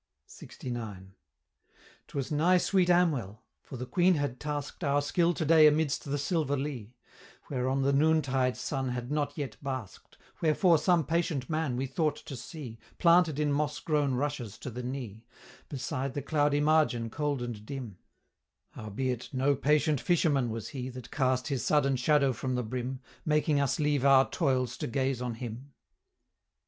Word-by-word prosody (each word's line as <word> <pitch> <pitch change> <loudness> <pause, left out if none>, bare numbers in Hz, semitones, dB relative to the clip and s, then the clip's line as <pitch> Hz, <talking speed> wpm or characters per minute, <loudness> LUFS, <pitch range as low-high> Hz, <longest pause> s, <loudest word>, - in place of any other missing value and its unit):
LXIX. 110 -7 -7 1.0
"'Twas 140 0 -4
nigh 165 +5 +4
sweet 180 0 +2
Amwell; 145 - +1 0.2
for 130 - -9
the 125 - -5
Queen 180 +7 +3
had 145 -4 -2
task'd 145 +2 -5
Our 140 -1 +2
skill 170 +4 +2
to 160 - -2
day 155 0 +7
amidst 150 -1 +1
the 145 0 -2
silver 145 -1 0
Lea, 130 -5 -5 0.6
Whereon 130 +1 0
the 140 +1 +2
noontide 140 -4 +2
sun 135 -2 -2
had 125 +1 -4
not 145 -1 -1
yet 140 -7 -4
bask'd, 130 -7 -6 0.2
Wherefore 165 +1 +4
some 170 0 +2
patient 160 -4 -1
man 155 -6 -1
we 130 - -1
thought 150 +3 0
to 155 -3 -9
see, 125 -3 -8 0.2
Planted 170 -3 +4
in 150 -1 +1
moss 150 0 -1
grown 145 -4 0
rushes 125 -6 -3
to 130 - -7
the 125 +2 -5
knee, 120 -4 -6 0.5
Beside 135 -1 -3
the 145 - -3
cloudy 145 0 +1
margin 150 -7 +2
cold 145 -3 -1
and 115 -4 -6
dim; 120 -6 -7 0.7
Howbeit 120 +4 -4
no 135 +2 +2
patient 150 +1 +2
fisherman 150 -8 +2
was 115 -1 -5
he 130 -2 -5
That 125 -1 -10
cast 130 -2 0
his 135 -5 -1
sudden 140 -3 +2
shadow 140 +1 +3
from 130 +2 -3
the 125 - -1
brim, 125 +3 -4 0.2
Making 150 -1 +2
us 140 +1 0
leave 145 -3 +1
our 135 -1 +6
toils 130 -6 0
to - - -3
gaze 130 0 -1
on 125 -2 -3
him." 125 +4 -8
140 Hz, 160 wpm, -29 LUFS, 125-150 Hz, 1.0 s, day